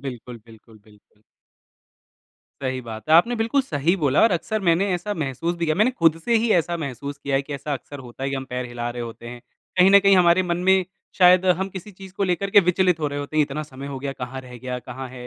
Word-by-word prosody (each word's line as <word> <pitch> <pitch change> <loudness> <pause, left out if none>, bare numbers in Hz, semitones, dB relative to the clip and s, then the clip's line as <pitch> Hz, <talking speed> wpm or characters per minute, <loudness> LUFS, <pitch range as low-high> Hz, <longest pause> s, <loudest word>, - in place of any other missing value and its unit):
बिल्कुल, 125 -3 -8
बिल्कुल, 110 -1 -17
बिल्कुल। 105 0 -24 1.4
सही 130 -1 -2
बात 115 +3 -9
है। 160 - +5
आपने 235 +9 +5
बिल्कुल 230 +5 +1
सही 160 - 0
बोला 145 -5 +2
और 225 - +5
अक्सर 215 +5 -2
मैंने 175 +4 +3
ऐसा 205 +4 -3
महसूस 155 +3 -3
भी 170 - -2
किया। 155 -1 +1
मैंने 215 +6 +3
खुद 165 -8 +2
से 235 - +1
ही 225 +1 +1
ऐसा 170 0 +1
महसूस 140 -2 -6
किया 140 -1 -1
है 140 - 0
कि 145 - -9
ऐसा 145 +2 -5
अक्सर 140 +2 -7
होता 120 +2 -11
है 135 - -1
कि 135 - -2
हम 135 - -5
पैर 125 0 -3
हिला 120 0 -5
रहे 120 0 -5
होते 115 0 -9
हैं। 120 0 -9 0.4
कहीं 185 +2 +6
न 200 - +8
कहीं, 195 -1 +5
हमारे 175 +1 +4
मन 175 -1 -1
में 190 -1 +4 0.3
शायद 180 0 +6
हम 185 +2 +1
किसी 190 +2 -9
चीज़ 190 0 -13
को 200 - -3
लेकर 185 +2 -1
के 205 - +7
विचलित 180 -1 +2
हो 150 - 0
रहे 145 0 -5
होते 145 +2 -6
हैं, 155 - +5
इतना 145 +1 -4
समय 140 -1 -10
हो 135 -2 -6
गया, 135 0 -4
कहाँ 130 0 -7
रह 125 -1 -12
गया, 125 0 -5
कहाँ 130 +1 -8
है, 125 -1 -10
150 Hz, 250 wpm, -22 LUFS, 130-185 Hz, 1.4 s, न